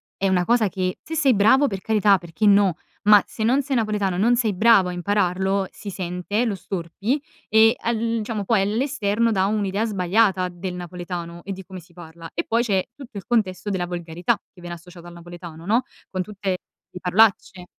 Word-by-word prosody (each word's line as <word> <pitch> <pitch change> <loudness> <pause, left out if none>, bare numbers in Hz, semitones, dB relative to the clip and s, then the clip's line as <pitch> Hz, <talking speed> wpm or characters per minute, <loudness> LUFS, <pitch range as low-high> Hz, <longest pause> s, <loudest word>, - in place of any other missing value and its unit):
è 195 0 0
una 180 -1 +2
cosa 230 -2 +3
che 185 0 -3
se 320 - -7
sei 285 -5 +4
bravo 225 +7 +4
per 195 -3 -4
carità 210 -3 +3
perché 175 +4 -4
no, 200 -4 +4 0.3
ma 210 -1 +7
se 220 - -5
non 260 +5 +3
sei 270 0 -2
napoletano, 210 -5 0
non 235 +4 +3
sei 225 -4 +1
bravo 200 -1 +5
a 180 - -4
impararlo 190 +1 0
si 205 - -9
sente, 185 +4 -2
lo 215 -4 -1
storpi, 195 - -3 0.3
e 220 +2 +5
al, 235 0 -1
uhm, 230 +1 -1
diciamo 215 -2 -4
poi 215 -1 +2
all'esterno 225 0 0
dà 190 -1 +2
un'idea 205 0 0
sbagliata 190 -1 +1
del 180 +1 -6
napoletano, 175 -1 -6
e 195 - -6
di 190 -1 -7
come 185 -1 -9
si 175 - -21
parla, 165 -1 -11
e 170 - -2
poi 230 +1 +1
c'è 195 -5 0
tutto 260 -7 -11
il 195 - -7
contesto 205 -5 0
della 185 -3 -1
volgarità 175 -1 -2 0.2
che 180 - -17
viene 175 0 -6
associato 175 0 -14
al 175 - -11
napoletano, 170 -1 -11
no, 230 +6 +2 0.3
con 185 - -2
tutte 195 0 -4 0.4
le 180 - -9
parolacce. 190 -1 +2
195 Hz, 200 wpm, -23 LUFS, 180-220 Hz, 0.4 s, ma